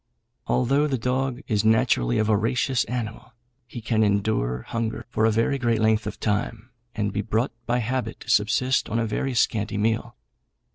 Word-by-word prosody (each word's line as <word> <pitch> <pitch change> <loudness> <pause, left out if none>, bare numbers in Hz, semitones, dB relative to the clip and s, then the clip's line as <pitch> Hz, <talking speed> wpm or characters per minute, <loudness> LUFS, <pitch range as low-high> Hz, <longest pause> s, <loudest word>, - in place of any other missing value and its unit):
Although 135 +4 +2
the 135 -3 -1
dog 130 +2 -1
is 105 -5 +1
naturally 110 - +2
a - - +3
voracious 115 +4 +1
animal, 115 0 -5 0.3
he 120 0 -8
can 110 -1 +1
endure 100 - 0
hunger 115 -1 -3
for 110 - +1
a - - +5
very 115 +6 +1
great 115 -3 +1
length 110 -1 +2
of 105 - -6
time, 110 +2 -2 0.2
and 105 -3 -1
be 105 - 0
brought 110 +5 -1 0.2
by 120 0 +1
habit 120 -1 -2
to 120 - -10
subsist 115 +5 +2
on 115 - -1
a 115 - +1
very 125 +4 -2
scanty 105 -3 +1
meal. 110 +2 -1
110 Hz, 175 wpm, -24 LUFS, 105-125 Hz, 0.3 s, a